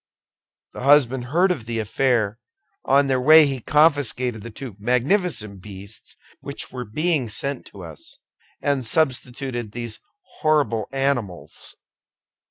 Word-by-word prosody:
The - - -8
husband 130 -2 +4
heard 175 +8 +2
of 120 -11 -4
the 115 -1 -3
affair; 110 -1 0 0.5
on 140 +1 +4
their 130 -2 0
way 155 +3 +8
he 135 -2 -2
confiscated 135 -5 +2
the 115 - -8
two 115 -1 -9
magnificent 125 - 0
beasts 100 +1 -10 0.2
which - - -7
were 125 -1 -6
being 150 +2 -1
sent 135 +6 -3
to 95 - -12
us, 80 -3 -12 0.5
and 140 -2 0
substituted 125 -3 -1
these 120 -2 -6 0.4
horrible 145 -9 +1
animals." 135 -9 -3
125 Hz, 125 wpm, -22 LUFS, 110-145 Hz, 0.5 s, way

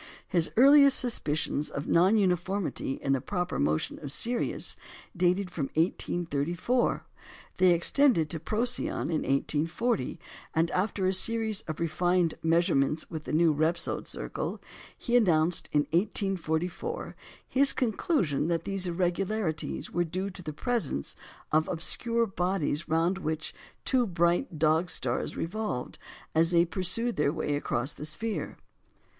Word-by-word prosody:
His 170 -3 +2
earliest 280 +2 +7
suspicions 155 - 0
of 140 - -5
non 185 +6 +4
uniformity 185 -5 0
in 135 - +1
the 135 - 0
proper 180 +3 -3
motion 75 +2 -1
of 145 -3 -6
Sirius 235 +10 -1 0.4
dated 180 +1 +1
from 155 -6 -2
1834; 175 - 0 0.5
they 185 0 +5
extended 175 - +3
to 165 - -3
Procyon 225 +1 +1
in 155 - 0
1840; 150 - -1 0.4
and 165 +1 +2
after 195 0 -1
a 185 - +2
series 220 +1 +3
of 155 -1 -5
refined 175 +1 +1
measurements 160 -3 +1
with 160 -2 -6
the - - -5
new 160 0 +3
Repsold 160 +3 0
circle, - - -4 0.4
he 240 - -1
announced 175 -7 +3
in 150 - +3
1844 185 - -1 0.3
his 275 +1 +3
conclusion 215 - 0
that 165 -1 -1
these 195 -2 -1
irregularities 180 0 -2
were 175 - +1
due 185 +4 -4
to 180 - -9
the 155 - -5
presence 155 - -2 0.4
of 155 +1 +2
obscure 230 +7 +1
bodies 180 -5 -2
round 165 +4 +1
which 155 -3 -3
the - - -25 0.3
two 250 -3 +2
bright 175 - 0
Dog 160 +3 +2
stars - - -1
revolved 170 - -4 0.3
as 165 +1 +3
they 170 -1 +4
pursued 210 +7 -1
their 150 -1 +2
way 155 -2 -2
across 135 -1 -2
the 150 - -7
sphere. 215 +8 -4
175 Hz, 135 wpm, -28 LUFS, 160-205 Hz, 0.5 s, earliest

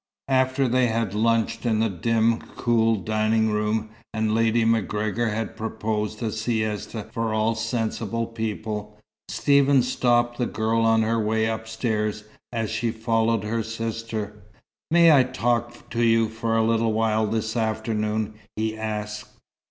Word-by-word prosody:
After 130 0 +2
they 125 +1 +3
had 115 -3 -1
lunched 115 +1 +1
in 115 -3 +1
the 115 - +3
dim, 115 +4 +1 0.2
cool 115 -2 +2
dining 110 +2 +1
room, 105 +1 -1 0.2
and 110 0 +1
Lady 115 0 +2
MacGregor 110 0 0
had 110 0 -3
proposed 110 0 -3
a 110 - -1
siesta 110 -1 -2
for 115 -1 -1
all 110 +1 +2
sensible 115 0 -2
people, 110 -2 -4 0.3
Stephen 140 +2 +4
stopped 120 -1 +1
the 120 - +1
girl 110 +1 0
on 115 0 +4
her 115 +1 +1
way 110 +1 +1
upstairs 110 -1 -2 0.3
as 115 -3 -2
she 120 - -1
followed 115 -1 0
her 115 +2 -1
sister. 115 -1 -4 0.6
"May 170 0 +6
I 140 -3 +7
talk 120 -1 -1
to 120 - -1
you 115 -1 +3
for 115 0 -1
a 110 - +3
little 115 0 +2
while 110 0 +1
this 110 +1 -2
afternoon?" 110 -1 -1 0.2
he 110 0 -1
asked. 105 -1 -4
110 Hz, 145 wpm, -24 LUFS, 110-115 Hz, 0.6 s, I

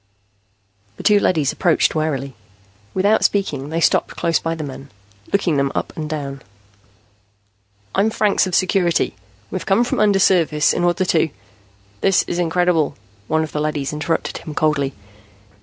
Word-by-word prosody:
The - - -8
two 210 -1 +5
leadys 155 -8 +1
approached 170 -4 +2
warily. 140 -4 -2 0.6
Without 205 +3 +3
speaking, 150 -9 0
they 165 +1 -1
stopped 170 - +2
close 165 -1 +1
by 165 0 -2
the 160 - -5
men, 140 -1 -8 0.4
looking 180 -6 +1
them 140 0 +1
up - - -3
and 155 -1 -5
down. 140 -3 -5 1.5
"I'm 200 +3 +2
Franks 210 -3 +2
of 185 - -1
Security. 185 -2 +2 0.4
We 185 - -2
came 195 +5 +2
from 245 - -2
undersurface 185 -7 +3
in 175 - -1
order 175 +2 +1
to 165 -2 +2 0.4
" 100 0 -33
"This 195 -1 +3
in 175 - -3
incredible," 175 -2 +1 0.3
one 160 +3 +1
of 155 - -6
the 150 - -2
leadys 150 -2 -2
interrupted 155 +2 -2
him 155 -3 -8
coldly. 145 -3 +1
160 Hz, 155 wpm, -20 LUFS, 150-185 Hz, 1.5 s, two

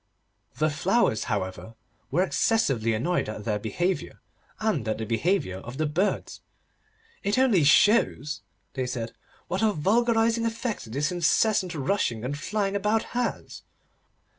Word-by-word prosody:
The 155 0 +1
Flowers, 160 - +1
however, 105 +1 -4 0.3
were 175 +7 +2
excessively 135 - +1
annoyed 170 +4 0
at 110 0 -6
their 105 -2 0
behaviour, 175 - -2 0.4
and 190 - 0
at 110 - 0
the 110 - -4
behaviour 115 - 0
of 120 +7 -9
the 155 - 0
birds. 175 +7 -1 0.8
'It 200 +3 0
only 240 - +4
shows,' 150 - +3 0.3
they 130 -2 -2
said, 115 -2 -4 0.4
'what 185 - -2
a 220 -1 +4
vulgarising 225 +5 +2
effect 225 - -4
this 145 +7 0
incessant 180 +1 +2
rushing 135 - -1
and 140 +3 -2
flying 200 +6 -2
about 210 +2 +1
has. 245 0 -3
170 Hz, 135 wpm, -26 LUFS, -, 0.8 s, only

